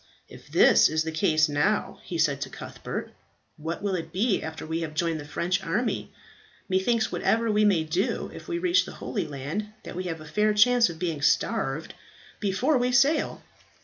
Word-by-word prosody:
"If - - -14
this - - +5
is 155 0 0
the 160 - -3
case 155 0 +3
now," 150 +9 0
he 170 - -5
said 145 -3 +1
to 135 - -3
Cuthbert, - - -6 0.5
"what 165 +5 -5
will 200 -2 0
it 165 -3 -4
be 200 +3 +1
after 160 0 -6
we 160 +1 -2
have 155 -2 -5
joined 165 0 0
the 145 - -8
French 180 +5 -1
army? 200 +8 -1 0.6
Methinks 220 +4 +1
whatever 230 0 +1
we 210 0 +3
may 185 -6 +3
do 170 +5 -1
if - - -10
we 345 -2 -2
reach 360 +1 +3
the - - -9
Holy - - -4
Land, 150 +9 -4 0.2
that - - -8
we 185 +1 -4
have 165 -2 -4
a 155 - -11
fair 210 +6 +1
chance 245 +1 +5
of 165 - -7
being 165 -3 -3
starved 145 0 0 0.5
before 245 +8 +1
we 250 +1 +1
sail." 275 +5 +2
180 Hz, 190 wpm, -26 LUFS, 160-215 Hz, 0.6 s, this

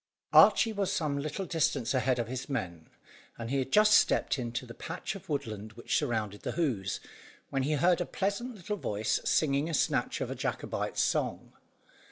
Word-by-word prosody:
Archy 225 -2 +7
was 200 -2 -1
some 155 -7 -1
little 155 +6 -3
distance 155 -8 0
ahead 130 -1 +2
of 120 -2 -2
his 130 +3 -5
men, 90 - -4 0.5
and 115 +1 -5
he 140 - +1
had 135 0 -3
just 210 0 +6
stepped 145 - +3
into 120 +1 -3
the 115 - -10
patch - - -5
of 195 - -11
woodland 110 -7 -4
which 120 +1 -3
surrounded 110 -7 -1
the - - -3
Hoze, 115 - -1 0.5
when 135 - 0
he 145 +4 0
heard 175 +4 +3
a - - 0
pleasant 205 +6 -2
little 205 +2 -4
voice 105 - -1
singing 145 +1 +2
a 165 - 0
snatch - - 0
of - - -3
a - - -3
Jacobite - - -3
song. - - 0
140 Hz, 185 wpm, -30 LUFS, 115-175 Hz, 0.5 s, Archy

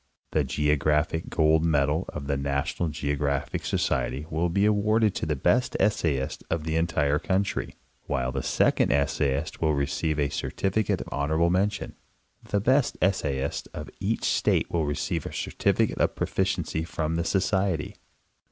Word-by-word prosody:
The 75 - +2
Geographic 75 +3 +1
Gold. 80 0 +3
Medal 75 +1 +1
of 75 -2 -6
the 70 0 0
NattonaL 70 +4 -1
GEOGRAPHIC 70 -1 -2
So - - -1
creTy 70 +5 -1
will 80 +3 0
be 100 +4 +2
awarded 105 0 +3
to - - -3
the 75 - 0
best 90 - +1
essayist 80 -10 0
of 85 -2 -1
the 80 0 -2
entire 75 -3 +1
country, 95 +2 -1 0.3
while 65 -3 -1
the - - -2
second - - +2
essayist 70 0 0
will 80 -2 +2
receive 70 +3 -1
a 70 -2 +1
certificate 100 +7 -1
of - - -8
honorable 80 +4 +1
mention. 100 +2 0 0.5
The 100 - 0
best 130 +6 +2
essayist 70 -8 0
of 75 - -7
each 105 +4 -1
state - - +1
will 80 -3 0
receive 75 - -2
a - - -4
certifi - - 0
cate - - -6
of - - +2
proficiency 95 -4 -1
from 80 -1 -2
the 85 - 0
Society. 95 -3 0
80 Hz, 155 wpm, -26 LUFS, 70-95 Hz, 0.5 s, Gold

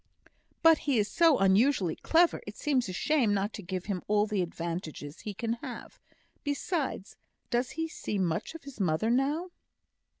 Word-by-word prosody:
"But 325 -1 +7
he 265 - +3
is 205 -1 +2
so 330 -5 +5
unusually 195 - +3
clever, 335 +1 +3
it - - -8
seems 260 -8 0
a - - -2
shame 225 +1 +2
not 200 +2 -1
to - - -6
give 185 0 -4
him 195 -4 -2
all 210 0 +3
the 210 -3 -1
advantages 165 -3 -5
he 210 - -5
can 230 +3 -1
have. - - -8 0.4
Besides, 285 - -2 0.3
does 245 +1 +1
he 325 0 0
see 215 -9 -4
much 180 - -1
of 330 - -9
his 275 -4 -11
mother 185 +4 +1
now?" 290 +8 0
220 Hz, 170 wpm, -29 LUFS, 190-285 Hz, 0.4 s, But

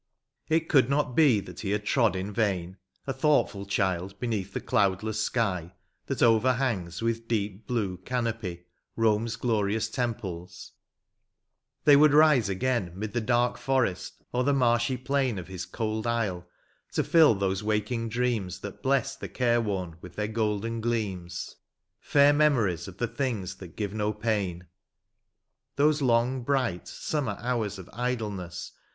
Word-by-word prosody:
It 160 0 +2
could 135 -5 +4
not 140 -3 0
be 135 -10 +5
that - - -11
he 100 - -3
had 105 +1 -1
trod 115 -7 +2
in 95 +2 -4
vain, 95 -4 -1 0.3
A 135 - -2
thoughtfdl 130 -9 +1
child, 95 0 -1
beneath 105 -6 -2
the - - -3
cloudless 105 +2 +1
sky, 90 -7 -1 0.3
That - - 0
overhangs 115 -6 +2
with 115 0 -1
deep 105 -2 -2
blue 105 -7 -1
canopy, 110 -5 -3 0.3
Bome's 115 0 +2
glorious 110 -1 0
temples; 95 -8 -4 1.1
they 145 - +7
would 145 0 +6
rise 150 -8 +5
again 100 -3 -1
'Mid 105 +1 -4
the 120 - 0
dark 120 +2 +1
forest, 130 -9 -1
or 125 +1 +1
the 140 +1 +2
marshy 120 0 +2
plain 130 -3 0
Of 90 -1 -7
his 95 -1 -6
cold 110 0 -3
isle, 100 -7 -1 0.5
to - - +1
fill 160 -9 +5
those 95 0 -1
waking 110 +2 -1
dreams 115 -5 -1
That 100 - -8
bless 135 0 +1
the - - -7
caxe 120 -2 +1
wom 90 -6 -3
with 90 - -11
their 105 0 -1
golden 110 +1 -1
gleams; 95 -6 -3 0.4
Fair 145 0 +4
memories 125 - +2
of 95 -1 -10
the 120 - -1
things 115 -7 -3
that 90 -4 -11
give 105 -2 -3
no 105 0 -1
pain. 100 -5 -2 1.1
Those 150 +1 +3
long, 125 0 +2
bright, 125 -8 -1
summer 135 -10 -3
hours 115 -5 -2
of 95 -2 -10
idleness. 105 -7 -3
110 Hz, 150 wpm, -27 LUFS, 95-125 Hz, 1.1 s, they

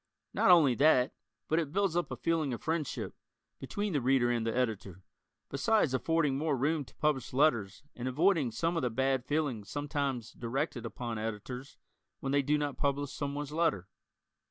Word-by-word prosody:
Not - - +3
only 160 -8 +7
that, 130 -1 +4 0.3
but 160 - +2
it 155 -4 -2
builds 195 -1 +1
up 175 - 0
a - - -4
feeling 160 -5 0
of - - -12
friendship, 160 -3 -2 0.5
between 205 -2 -3
the 145 - +1
Reader 125 -1 +3
and 115 -1 0
the 115 - -1
Editor, 100 -7 -2 0.5
besides 155 - +2
affording 150 0 +1
more 150 -2 0
room 150 +4 +1
to - - -19
publish 150 -6 0
letters 120 -7 +2
and 125 +1 -4
avoiding 155 +1 +2
some 165 +10 -1
of 165 - 0
the 125 - 0
bad 130 +1 0
feelings 140 -9 -1
sometimes 140 -5 -2
directed 125 0 -3
upon 115 -1 -5
Editors 115 +5 -6 0.4
when 135 - -3
they 140 0 +3
do 145 +2 +2
not 145 -2 -2
publish 140 0 0
someone's 145 0 -4
letter. 150 - 0
140 Hz, 175 wpm, -31 LUFS, 120-155 Hz, 0.5 s, only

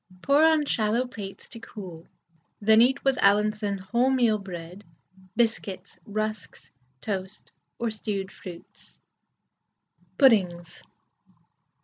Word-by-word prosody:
Pour 280 +2 +4
on 320 -2 +4
shallow 230 -1 +1
plates 205 -6 -9
to 230 - -10
cool, 185 -7 -10 0.5
then 220 +2 +5
eat 265 +3 +3
with 270 -1 +2
Allinson 210 0 +2
wholemeal 235 +1 +1
bread, 180 +1 -8 0.5
biscuits, 205 -5 -2
rusks, 215 +1 -5 0.3
toast, 195 -1 -5 0.3
or 235 -1 -1
stewed 200 -3 -4
fruits. 175 -2 -13 1.2
PUDDINGS. 185 - +3
215 Hz, 95 wpm, -26 LUFS, 195-235 Hz, 1.2 s, then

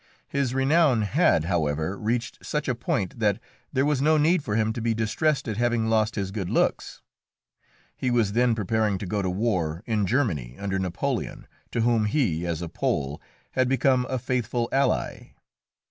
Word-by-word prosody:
His 135 -3 -1
renown 135 -3 +3
had, 105 - +3
however, 80 0 0
reached 115 +3 -3
such 150 0 -2
a 130 - +1
point 115 -3 -2
that 105 -3 +2 0.3
there 135 -1 +1
was 145 -3 +1
no 155 +2 +4
need 155 +2 +3
for 105 - -2
him 110 0 +1
to 115 - -5
be 115 0 0
distressed 135 +7 0
at 110 -2 -3
having 120 -2 +1
lost 110 0 +2
his 95 -2 -2
good 95 -4 -4
looks. - - 0 0.9
He 130 - -1
was 115 -4 +2
then 120 0 +3
preparing 110 -1 0
to 100 - -6
go 100 +3 -1
to 95 - -1
war 90 -4 -1
in 105 -4 0
Germany 85 - 0
under 95 -1 -2
Napoleon, 90 -2 -3 0.2
to 115 - -1
whom 115 -2 +2
he, 100 - 0
as 85 0 -2
a - - -4
Pole, 70 -2 -2 0.3
had 130 -1 +1
become 130 -1 +2
a 130 - -1
faithful 120 -1 -1
ally. 135 +1 0
110 Hz, 175 wpm, -25 LUFS, 95-130 Hz, 0.9 s, no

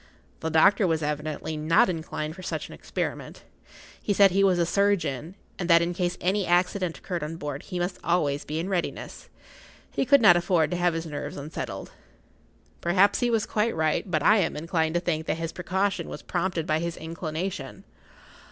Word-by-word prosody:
The 160 - -2
doctor 190 +5 +4
was 160 -2 0
evidently 150 +1 -3
not 155 +2 +3
inclined 160 -3 -4
for 185 - -10
such 185 - -4
an - - -10
experiment. - - -5 0.6
He 205 - 0
said 200 -1 +6
he 195 +2 +3
was 190 -2 +4
a 170 - +2
surgeon, 170 -5 0 0.2
and 180 -1 -3
that 170 0 +6
in 175 +1 -1
case 175 0 -1
any 195 +3 +1
accident 180 0 +1
occurred 175 -3 -4
on 155 +2 -4
board 145 -2 -5
he 180 - -6
must 175 +1 -2
always 150 -5 +1
be 155 - -4
in 165 +3 -2
readiness. 185 -3 -4 0.6
He - - 0
could 280 +3 +6
not 200 -6 +7
afford 170 -3 +2
to 175 - -1
have 175 -1 +1
his 165 0 -3
nerves 150 -3 -5
unsettled. 145 +2 -6 0.9
Perhaps 190 +4 +3
he 245 - +1
was 225 -3 +1
quite 225 +2 0
right, 160 +4 0
but 155 -4 0
I 210 +6 +6
am 175 -6 0
inclined 160 0 -1
to - - +3
think 160 -3 -2
that - - 0
his 165 0 -3
precaution 190 +3 -1
was - - -8
prompted 175 -2 -1
by 155 0 +1
his 170 0 -3
inclination. 165 +3 -5
170 Hz, 190 wpm, -26 LUFS, 160-190 Hz, 0.9 s, not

